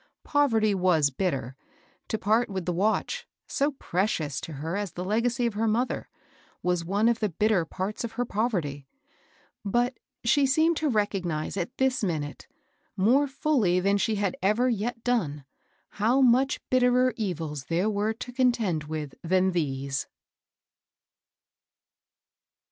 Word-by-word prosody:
Poverty 225 -8 +2
was 175 -6 +3
bitter; 135 -5 -2 0.5
to 220 - -1
part 220 +4 +2
with 190 -3 -4
the 180 - 0
watch, 220 - 0 0.2
so 285 +1 0
precious 175 - -1
to 160 - -7
her 160 +5 -4
as 205 -3 -3
the 180 - -5
legacy 230 +4 +1
of 235 - 0
her 220 +2 0
mother, 235 +4 -1 0.5
was 180 -1 +1
one 200 +6 +1
of 235 -1 +2
the 215 - 0
bitter 200 0 +1
parts 190 +7 -4
of 230 -1 -4
her 245 - -1
poverty; 175 - -2 0.8
but 240 +5 0 0.2
she 270 +4 +4
seemed 315 +5 +3
to 310 - 0
recognize 195 - -1
at 200 +7 -4
this 265 -2 +1
minute, 155 -6 -3 0.5
more 250 +9 +4
folly 265 -10 +1
than 200 +2 +2
she 220 +2 +1
had 200 -3 -1
ever 210 +6 +2
yet 230 0 -2
done, 155 - -1 0.4
how 230 +6 +1
much 260 +2 +3
bitterer 250 0 +4
evils 165 - -3
there 170 +7 0
were 210 0 0
to 245 +2 -7
contend 235 - +1
with 150 -2 -5
than 185 +2 +2
these. 140 -5 -2
205 Hz, 145 wpm, -27 LUFS, 175-245 Hz, 0.8 s, she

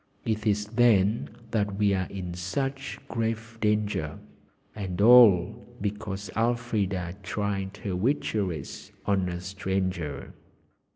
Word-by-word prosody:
It 110 -1 -1
is 105 0 +2
then 110 -2 +3 0.2
that 105 -3 0
we 100 0 +2
are 95 -2 0
in 90 -3 -5
such 135 +10 -3
grave 115 -1 -3
danger 105 -8 0 0.6
and 95 -4 -4
all 110 -6 +7 0.2
because 100 -2 -4
Elfrida 110 -6 0
tried 100 0 -3
her 100 -4 -2
witcheries 95 - -2
on 95 -2 +1
a 85 0 -4
stranger." 95 -5 -3
100 Hz, 110 wpm, -27 LUFS, 95-110 Hz, 0.6 s, all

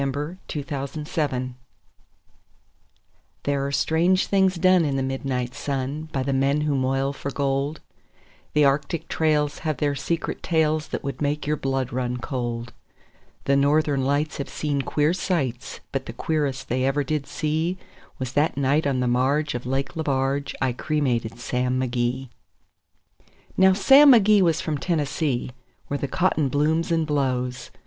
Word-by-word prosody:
The 145 +5 -3
Cremation 145 0 -4
of 150 - -8
Sam 155 -2 0
Mcgee 130 -1 -4 1.9
There 140 -1 0
are - - -3
strange 165 +7 +2
things 190 -1 +2
done 185 0 +4
in 145 -3 0
the 135 - 0
midnight 130 -2 -2
sun 140 +3 -3
By 135 - -1
the 135 +1 -1
men 140 +2 +2
who 150 -1 0
moil 135 +1 0
for 140 - -5
gold; 140 +2 -1 0.7
The 150 -1 +4
Arctic 145 +3 0
trails 150 -2 +1
have 155 -3 -2
their 145 +1 +1
secret 160 +4 -3
tales 155 -2 +1
That - - -4
would 140 +1 -5
make 145 +1 -1
your 150 +1 +1
blood 135 -3 -2
run 125 -1 -1
cold; 120 -2 -4 0.7
The 140 - +2
Northern 140 0 +2
Lights 145 +2 0
have 140 - -4
seen 145 -2 -1
queer 150 +4 +1
sights, 145 -10 -2
But 135 -1 -3
the 115 - -6
queerest 140 -2 -2
they 130 +2 0
ever 135 +2 +1
did 150 0 -2
see 160 +3 -1 0.4
Was 130 -1 -4
that 150 0 +1
night 140 +2 +2
on 130 -2 0
the 125 - +1
marge 140 +5 +1
of 125 0 -5
Lake 135 +5 -2
Lebarge 140 -2 -1
I 130 -2 +1
cremated 125 -6 -1
Sam 125 +1 -1
McGee. 125 +1 -1 1.3
Now 190 0 +6
Sam 275 +8 +7
McGee 210 -3 +5
was 165 -3 +2
from 150 -3 -2
Tennessee, 145 -5 -1 0.4
where 145 - -2
the 140 - -2
cotton 155 -4 +1
blooms 155 +5 +1
and 165 -1 +2
blows. 130 -4 -1
140 Hz, 160 wpm, -24 LUFS, 130-155 Hz, 1.9 s, Sam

